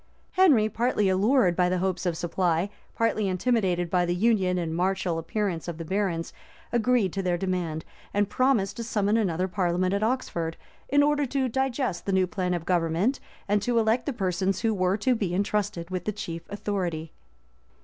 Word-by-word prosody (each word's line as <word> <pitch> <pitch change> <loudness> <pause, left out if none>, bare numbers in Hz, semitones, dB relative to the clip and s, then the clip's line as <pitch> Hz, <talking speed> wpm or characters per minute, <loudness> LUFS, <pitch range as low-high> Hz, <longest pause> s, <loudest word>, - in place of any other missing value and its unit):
Henry, 295 - +5
partly 220 -2 +1
allured 195 0 +3
by 180 0 +2
the 185 - +1
hopes 185 0 -1
of 170 -2 -1
supply, 175 +2 0 0.2
partly 220 -2 +1
intimidated 185 -3 +1
by 180 -1 +3
the 175 0 0
union 190 -3 +2
and 165 -2 -2
martial 180 -1 0
appearance 180 0 -2
of 170 -2 -4
the 165 - -6
barons, 185 -2 -1 0.4
agreed 240 -5 +2
to 195 - -1
their 180 -2 0
demand, 175 -4 -2 0.3
and 205 0 +1
promised 210 -5 +1
to 235 - -3
summon 210 -2 +1
another 185 -5 +1
parliament 185 -1 0
at 200 - 0
Oxford, 195 -9 -1 0.3
in 285 0 +4
order 290 -1 +2
to 265 +1 0
digest 255 -6 -1
the 195 - +1
new 190 -1 +4
plan 180 -2 -1
of 170 -2 -5
government, 175 +8 +1 0.3
and 205 0 +2
to 240 +3 0
elect 225 +4 +2
the - - +1
persons 190 -2 -1
who 225 -1 +2
were 185 0 +1
to 255 +4 +2
be 195 -7 -1
intrusted 195 -3 -1
with 185 -2 -3
the 215 - 0
chief 170 -5 -7
authority. 180 -6 -3
190 Hz, 180 wpm, -26 LUFS, 175-220 Hz, 0.4 s, Henry